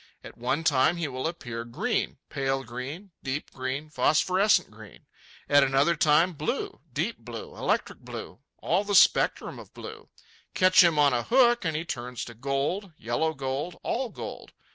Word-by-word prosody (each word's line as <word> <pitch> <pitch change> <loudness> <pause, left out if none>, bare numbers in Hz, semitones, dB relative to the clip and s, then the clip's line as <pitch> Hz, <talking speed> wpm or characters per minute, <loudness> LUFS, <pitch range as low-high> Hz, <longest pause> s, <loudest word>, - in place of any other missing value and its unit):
At - - -11
one 130 +6 -1
time 150 +2 +3
he 170 -2 -1
will 130 +1 -3
appear 120 -9 -5
green—pale 135 +3 -2
green, 135 - -7
deep 135 +2 -4
green, 130 +3 -4
phosphorescent 185 - +3
green; 110 -1 -14 0.4
at 145 -1 +6
another 135 +5 +3
time 160 +4 +4
blue—deep 150 - -3
blue, - - -8
electric - - -1
blue, 90 - -8 0.2
all 180 +5 +1
the 205 -1 -1
spectrum - - +4
of - - -14
blue. - - -10 0.5
Catch 185 0 +6
him 170 -3 +3
on 145 -2 +5
a 120 - +1
hook, 240 - +4
and 160 -1 0
he 160 +2 -2
turns 125 -5 -5
to 120 - -9
gold, 140 - -2
yellow 120 +8 -1
gold, 135 +5 -4
all 250 +1 -1
gold. - - -8
145 Hz, 155 wpm, -27 LUFS, 130-175 Hz, 0.5 s, at